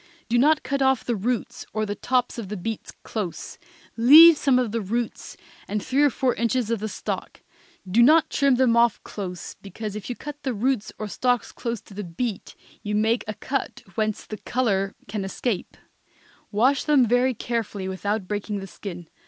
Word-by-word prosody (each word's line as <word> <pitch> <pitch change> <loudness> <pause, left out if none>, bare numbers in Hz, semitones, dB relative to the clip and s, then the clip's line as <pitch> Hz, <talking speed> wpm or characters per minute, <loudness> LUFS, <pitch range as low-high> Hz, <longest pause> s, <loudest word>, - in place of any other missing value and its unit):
Do 240 +1 +3
not 305 +4 +4
cut 275 +1 -2
off 265 -2 +3
the 240 - 0
roots 230 +3 -2
or 215 0 0
the 205 - -3
tops 245 +3 0
of 205 -5 -6
the 210 - -4
beets 220 +4 -5
close; 205 -7 -5 0.4
leave 310 +8 +9
some 275 -3 +2
of 245 -4 0
the 230 0 -1
roots 230 +4 -4 0.3
and 210 - -1
three 270 +2 +1
or 290 - +6
four 255 0 0
inches 235 0 0
of 230 - 0
the 215 +1 -3
stalk. 190 - -5 0.4
Do 205 +6 +3
not 310 +5 +5
trim 275 -2 +3
them 245 -2 +3
off 235 -1 +4
close, 180 -4 -6
because 210 +1 -6
if 210 +2 -6
you 245 - -3
cut 295 +2 -8
the 260 -4 -2
roots 235 0 0
or 215 - -4
stalks 245 +3 0
close 235 -3 -4
to - - -16
the 205 +1 -5
beet 200 +5 -4 0.3
you 210 0 -2
make 220 +3 +2
a 215 - -4
cut 275 -1 -4
whence 215 +1 -2
the 215 - -7
color 200 -7 -1
can 200 0 -3
escape; 195 +2 -3 0.7
wash 255 +6 +3
them 290 -5 +4
very 245 +2 +2
carefully 215 -5 -3
without 200 +1 -2
breaking 205 +1 -3
the 195 - -6
skin. 175 -3 -8
230 Hz, 190 wpm, -24 LUFS, 205-255 Hz, 0.7 s, leave